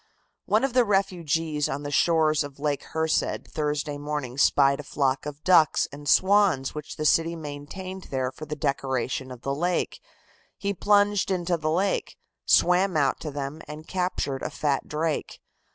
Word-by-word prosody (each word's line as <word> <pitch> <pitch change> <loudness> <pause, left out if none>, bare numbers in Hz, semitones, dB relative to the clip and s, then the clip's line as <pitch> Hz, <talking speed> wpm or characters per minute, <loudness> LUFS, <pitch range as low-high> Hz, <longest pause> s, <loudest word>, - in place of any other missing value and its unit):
One - - +2
of 270 -3 0
the 250 -1 +5
refugees 165 -7 0
on 145 +2 -4
the 145 - -5
shores 155 -1 +3
of 145 -1 -9
Lake 145 -1 -2
Herced 160 0 0
Thursday 150 -1 -2
morning 145 -4 -4
spied 140 -1 +4
a - - -5
flock 140 -1 -1
of 150 0 -8
ducks 175 -5 +4
and 145 +1 -6
swans 190 -9 +3
which 150 0 -7
the 155 - -4
city 165 +2 +3
maintained 165 +5 -7
there 130 -1 -1
for 155 +3 -10
the 150 - -4
decoration 130 -2 -2
of 125 -1 -10
the 135 - -1
lake. 175 +5 -1 0.6
He 200 -1 -2
plunged 205 +1 +2
into 180 -2 0
the 155 -2 -2
lake, 190 +5 0 0.3
swam 180 0 +4
out 140 -3 +1
to 155 - -5
them 145 +2 -5
and 150 +1 -9
captured 180 -7 -2
a - - -3
fat 145 -3 -1
drake. 155 0 -2
155 Hz, 170 wpm, -26 LUFS, 145-180 Hz, 0.6 s, the